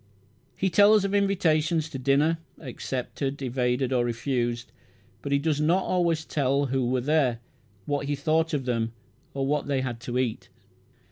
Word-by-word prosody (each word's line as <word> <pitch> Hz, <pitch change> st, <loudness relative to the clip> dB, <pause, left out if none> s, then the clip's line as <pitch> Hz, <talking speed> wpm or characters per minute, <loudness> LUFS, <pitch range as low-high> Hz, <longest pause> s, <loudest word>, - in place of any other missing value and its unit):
He 190 Hz, -1 st, 0 dB
tells 205 Hz, +2 st, +6 dB
of 200 Hz, -, -2 dB
invitations 165 Hz, -5 st, +2 dB
to 135 Hz, -, -6 dB
dinner, 145 Hz, +5 st, +2 dB, 0.2 s
accepted, 135 Hz, +1 st, -4 dB
evaded, 125 Hz, +1 st, 0 dB
or 125 Hz, -1 st, +2 dB
refused; 120 Hz, 0 st, -2 dB, 0.5 s
but 140 Hz, -, -5 dB
he 140 Hz, -, +4 dB
does 150 Hz, 0 st, 0 dB
not 175 Hz, +5 st, +3 dB
always 170 Hz, -3 st, 0 dB
tell 140 Hz, -1 st, +1 dB
who 130 Hz, -2 st, 0 dB
were 125 Hz, 0 st, 0 dB
there, 140 Hz, -3 st, +2 dB, 0.5 s
what 145 Hz, -1 st, -2 dB
he 145 Hz, -, 0 dB
thought 160 Hz, +2 st, +1 dB
of 135 Hz, -3 st, -3 dB
them, 115 Hz, -2 st, -1 dB, 0.4 s
or 135 Hz, -1 st, -1 dB
what 145 Hz, +1 st, 0 dB
they 140 Hz, -2 st, 0 dB
had 120 Hz, -3 st, -4 dB
to 120 Hz, +2 st, -4 dB
eat. 125 Hz, -4 st, -2 dB
140 Hz, 160 wpm, -26 LUFS, 125-160 Hz, 0.5 s, tells